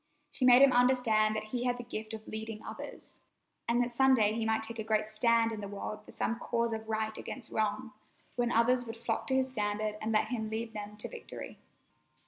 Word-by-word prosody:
She 255 - 0
made 250 +1 +8
him 275 -2 +6
understand 245 -4 +3
that 215 - -2
he 240 +3 -3
had 245 0 +1
the 245 - -6
gift 220 -2 -5
of 220 0 -11
leading 220 0 -6
others, - - -9 0.5
and 235 +1 +2
that 240 - -3
some 265 +2 +5
day 215 -3 +3
he 225 0 -1
might 220 0 +1
take 230 +1 -2
a - - -1
great 215 -1 +1
stand 230 +1 +2
in 215 -2 -5
the 200 - -5
world 205 +1 -6
for - - -18
some 230 +1 -2
cause 235 -1 0
of 220 0 -6
Right 220 0 -1
against 250 -4 -7
Wrong, 220 +2 -1 0.4
when 240 -1 +1
others 245 +1 +3
would 225 +1 -6
flock 225 -1 -2
to 265 - +1
his 260 0 +1
standard 210 -2 -2
and 220 - -1
let 215 0 +2
him 220 -3 -2
lead 225 +1 -4
them 210 0 -7
to 210 - -5
victory. 485 - -9
225 Hz, 225 wpm, -31 LUFS, 215-245 Hz, 0.5 s, made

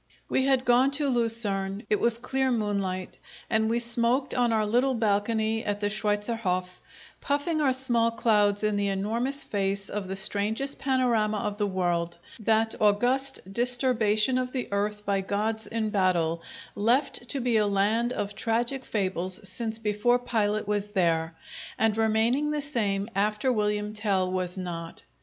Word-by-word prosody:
We 265 0 +1
had 265 -1 +2
gone 245 +2 +5
to 295 -2 0
Lucerne; 220 -5 -1
it 210 - +1
was 235 -1 +2
clear 260 +2 -1
moonlight, 200 -5 -2 0.3
and 220 -1 +2
we 230 - +1
smoked 240 +3 0
on 245 -2 +2
our 220 -1 +2
little 250 +5 +2
balcony 220 +1 0
at 205 0 -2
the 205 0 0
Schweitzerhof, 205 -3 -1 0.6
puffing 290 +3 0
our 275 -3 +3
small 240 -3 +1
clouds 210 -3 +2
in 210 -1 +1
the 200 0 0
enormous 230 +8 -2
face 195 -2 -2
of 205 -2 -4
the 190 - -4
strangest 210 +7 -2
panorama 240 -5 +1
of 205 0 -3
the 205 - +1
world, 175 -3 -1 0.2
that 220 +1 +2
august 245 +1 +1
disturbation 245 -1 +2
of 255 0 -3
the 255 -2 -2
earth 210 +1 -2
by 195 -1 +1
gods 215 +2 -2
in 220 0 -2
battle, 175 -4 +1 0.3
left 245 +3 +1
to 280 - -1
be 240 -2 +2
a 210 -1 +3
land 210 +4 +1
of 205 -4 -3
tragic 240 +4 -1
fables 185 -3 -2
since 220 +3 -2
before 220 +2 +2
Pilate 215 -4 -1
was 205 -1 -1
there, 165 -5 0 0.4
and 220 -1 +2
remaining 225 +6 +2
the 300 -1 -1
same 205 -8 -1
after 210 +5 +1
William 210 -1 -1
Tell 195 -4 0
was 185 0 -2
not. 170 -2 -6
215 Hz, 155 wpm, -27 LUFS, 200-240 Hz, 0.6 s, gone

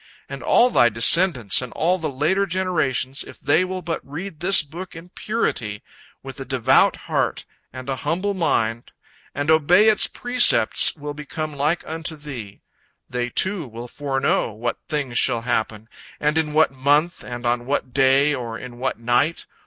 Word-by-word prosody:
And - - -8
all 245 +1 +3
thy 120 - +4
descendants 120 - +4
and 125 - -7
all 180 +3 0
the 160 -2 -3
later 155 +9 0
generations, 165 -8 -1
if - - -14
they 145 +6 +2
will 185 0 -5
but 165 0 -3
read 160 +4 -8
this 185 0 +4
book 170 +5 -10
in 165 +2 -11
purity, 120 - -3 0.4
with 135 -1 -9
a - - -5
devout 130 -3 +2
heart - - -2 0.3
and 130 +1 -9
an 135 -1 -3
humble 180 +9 -2
mind, 120 - -1 0.5
and 145 +2 0
obey 175 +7 +5
its 215 - +3
precepts, 245 0 +4
will 145 -2 -7
become 150 +1 -6
like 150 +5 -1
unto 160 0 -4
thee. 130 -9 -9 0.5
They, 125 -1 -2
too, 185 - -1
will 120 +1 -9
foreknow 135 -4 -1
what 115 +3 -4
things 140 -6 0
shall 120 -3 +2
happen, 110 -2 -3 0.3
and 150 +1 0
in 155 -2 -1
what 155 -1 +3
month 145 +6 +1
and 120 0 -7
on 120 0 -1
what 135 -3 -2
day 135 +2 +3
or 120 -4 -5
in 120 0 -10
what 130 +1 -2
night. 120 +8 0
145 Hz, 170 wpm, -21 LUFS, 125-165 Hz, 0.5 s, obey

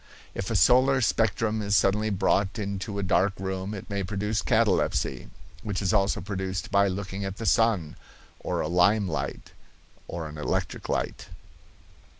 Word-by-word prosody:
If - - -4
a - - -1
solar 130 +2 +5
spectrum 110 -2 +1
is 100 -1 +1
suddenly 105 +3 +2
brought 100 +1 +1
into 100 0 -4
a 100 - -1
dark 95 +1 +2
room 95 +2 -3
it 95 - -8
may 100 -2 -2
produce 105 +3 -1
catalepsy, 110 -4 +1 0.3
which 105 -3 -3
is 95 -2 0
also 100 0 +2
produced 95 -1 -4
by 100 0 +4
looking 100 +1 -4
at 95 0 -4
the 115 - -5
sun, 105 -10 +2 0.4
or - - -2
a - - -1
lime 100 +5 +3
light, 80 -3 -4 0.6
or 85 -2 -5
an 75 0 -9
electric 75 - -3
light. - - -2
100 Hz, 155 wpm, -26 LUFS, 95-105 Hz, 0.6 s, solar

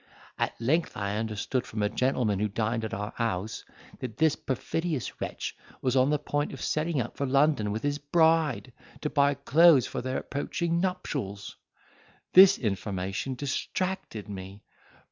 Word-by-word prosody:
At - - -1
length 155 +9 0
I 100 0 -2
understood 110 +3 -2
from 110 -1 -3
a - - +3
gentleman 115 -3 0
who 105 - +1
dined 110 +2 -1
at 110 - -3
our 105 +2 -4
house, 110 -3 -2 0.4
that 120 -4 -6
this 160 -1 +3
perfidious 155 +2 -3
wretch - - -4 0.2
was 130 0 0
on 130 +1 +4
the 150 - +3
point 145 0 -2
of - - -8
setting 155 -1 0
out 120 - -3
for 140 - -2
London 135 -5 +3
with 110 +2 -3
his 145 0 0
bride, 160 -4 +2 0.3
to 150 - -2
buy 140 -1 +3
clothes 145 0 +5
for - - -4
their 130 +1 -2
approaching 170 +4 -2
nuptials. 140 - -3 0.8
This 190 +1 +9
information 100 +2 -2
distracted 145 - -3
me! 100 0 -8
130 Hz, 155 wpm, -28 LUFS, 105-150 Hz, 0.8 s, This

